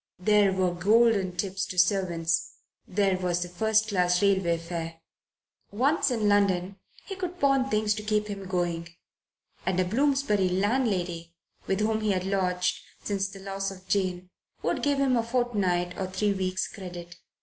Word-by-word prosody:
There 205 Hz, +2 st, +4 dB
were 185 Hz, -2 st, +1 dB
golden 200 Hz, 0 st, +3 dB
tips 195 Hz, +1 st, -2 dB
to 185 Hz, -, -7 dB
servants, 175 Hz, -3 st, +1 dB, 0.3 s
there 195 Hz, -1 st, +1 dB
was 180 Hz, -1 st, 0 dB
the -, -, -6 dB
first 220 Hz, +4 st, +1 dB
class 180 Hz, -3 st, +2 dB
railway 190 Hz, -4 st, +2 dB
fare. 165 Hz, -1 st, -6 dB, 0.7 s
Once 275 Hz, +7 st, +1 dB
in 225 Hz, -4 st, 0 dB
London 200 Hz, -2 st, +2 dB, 0.3 s
he 390 Hz, -, -6 dB
could 360 Hz, -1 st, -5 dB
pawn 275 Hz, -3 st, +2 dB
things 215 Hz, -1 st, +1 dB
to 210 Hz, -, -5 dB
keep 210 Hz, 0 st, 0 dB
him 200 Hz, -2 st, -6 dB
going, 175 Hz, -2 st, -2 dB, 0.7 s
and 185 Hz, -1 st, 0 dB
a 185 Hz, -, +3 dB
Bloomsbury 230 Hz, -3 st, +1 dB
landlady 185 Hz, -5 st, -1 dB, 0.3 s
with 195 Hz, +2 st, 0 dB
whom 220 Hz, 0 st, +1 dB
he 210 Hz, -2 st, +1 dB
had 185 Hz, -1 st, -2 dB
lodged, 180 Hz, -2 st, 0 dB, 0.2 s
since 195 Hz, -1 st, -1 dB
the 195 Hz, -1 st, -11 dB
loss 195 Hz, 0 st, -3 dB
of 190 Hz, -1 st, -12 dB
Jane, 185 Hz, -2 st, -1 dB, 0.3 s
would -, -, 0 dB
give 285 Hz, -1 st, +1 dB
him 270 Hz, -2 st, +3 dB
a 235 Hz, -, +3 dB
fortnight 210 Hz, -8 st, 0 dB
or 190 Hz, -, -1 dB
three 200 Hz, +2 st, 0 dB
weeks' 185 Hz, -1 st, -1 dB
credit. 175 Hz, -3 st, -9 dB
195 Hz, 160 wpm, -27 LUFS, 180-215 Hz, 0.7 s, There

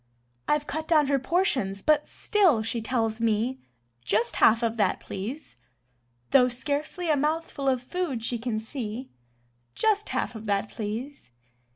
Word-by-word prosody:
I've 295 Hz, 0 st, +2 dB
cut 315 Hz, +1 st, -4 dB
down 310 Hz, -3 st, +5 dB
her 280 Hz, -1 st, +3 dB
portions 260 Hz, -, 0 dB
but 300 Hz, -1 st, +3 dB
still 360 Hz, -, +2 dB
she 225 Hz, +1 st, -2 dB
tells 225 Hz, -1 st, -1 dB
me: 230 Hz, +4 st, +1 dB, 0.4 s
"Just 210 Hz, -, 0 dB
half 225 Hz, +2 st, +5 dB
of 230 Hz, -1 st, +1 dB
that, 210 Hz, -, +2 dB
please." 235 Hz, +11 st, -6 dB, 0.7 s
Though 255 Hz, -2 st, +6 dB
scarcely 295 Hz, +7 st, -2 dB
a -, -, +4 dB
mouthful 300 Hz, -1 st, 0 dB
of 255 Hz, -2 st, 0 dB
food 270 Hz, -6 st, -3 dB
she 240 Hz, -1 st, -2 dB
can 230 Hz, -1 st, -2 dB
see: 230 Hz, +1 st, -5 dB, 0.6 s
"Just 425 Hz, -1 st, +1 dB
half -, -, -1 dB
of 220 Hz, -1 st, -8 dB
that, 200 Hz, +1 st, 0 dB
please." 225 Hz, -, -5 dB
255 Hz, 150 wpm, -27 LUFS, 225-300 Hz, 0.7 s, Though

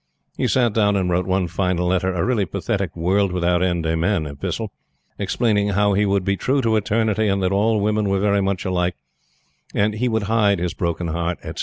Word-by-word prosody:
He -, -, 0 dB
sat 120 Hz, -4 st, +2 dB
down 105 Hz, -2 st, +2 dB
and 95 Hz, -2 st, 0 dB
wrote 90 Hz, +1 st, 0 dB
one 95 Hz, -1 st, +1 dB
final 90 Hz, 0 st, -1 dB
letter 95 Hz, 0 st, +1 dB
a 90 Hz, -2 st, -1 dB
really 115 Hz, -6 st, +1 dB
pathetic 100 Hz, 0 st, -3 dB
"world 95 Hz, +3 st, +1 dB
without 90 Hz, 0 st, +1 dB
end, 85 Hz, -3 st, 0 dB
amen," 80 Hz, +2 st, 0 dB
epistle; 70 Hz, -1 st, -4 dB, 0.5 s
explaining 105 Hz, -3 st, +1 dB
how 100 Hz, 0 st, +2 dB
he 100 Hz, +1 st, +2 dB
would 100 Hz, -1 st, +1 dB
be 100 Hz, 0 st, +1 dB
true 135 Hz, +8 st, 0 dB
to 110 Hz, -1 st, +2 dB
Eternity, 110 Hz, 0 st, +1 dB
and 100 Hz, -1 st, 0 dB
that 90 Hz, -, +1 dB
all 105 Hz, +2 st, +2 dB
women 105 Hz, 0 st, 0 dB
were 95 Hz, 0 st, +1 dB
very 100 Hz, 0 st, +2 dB
much 95 Hz, -1 st, -1 dB
alike, 90 Hz, -2 st, 0 dB, 0.8 s
and 105 Hz, +1 st, +2 dB
he 120 Hz, +4 st, -1 dB
would 110 Hz, -2 st, 0 dB
hide 105 Hz, -1 st, +2 dB
his 85 Hz, 0 st, -2 dB
broken 85 Hz, 0 st, -2 dB
heart, 85 Hz, +1 st, -2 dB
etc. -, -, -7 dB
100 Hz, 205 wpm, -21 LUFS, 90-105 Hz, 0.8 s, sat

